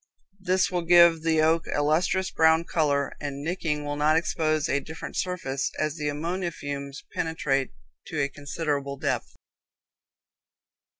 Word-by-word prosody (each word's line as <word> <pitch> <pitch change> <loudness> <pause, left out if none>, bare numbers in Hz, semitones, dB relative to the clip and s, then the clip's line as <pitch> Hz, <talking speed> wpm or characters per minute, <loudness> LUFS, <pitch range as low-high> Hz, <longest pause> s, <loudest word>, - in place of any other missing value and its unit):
This 185 0 +1
will 180 -1 0
give 170 -1 +6
the 160 -1 +2
oak 160 +1 +3
a 145 - +1
lustrous 180 +5 +1
brown 160 0 +4
color, 145 -4 0
and 140 -1 -5
nicking 160 -3 -2
will 145 0 -2
not 155 +2 +3
expose 155 -2 0
a 140 - +1
different 160 +3 -8
surface, 155 -7 -2
as 155 -1 -1
the 150 -1 -1
ammonia 170 +5 -2
fumes 140 -2 -6
penetrate 140 -5 0 0.4
to 155 - -4
a 140 - +2
considerable 145 -1 -3
depth. - - -2
155 Hz, 140 wpm, -26 LUFS, 145-165 Hz, 0.4 s, give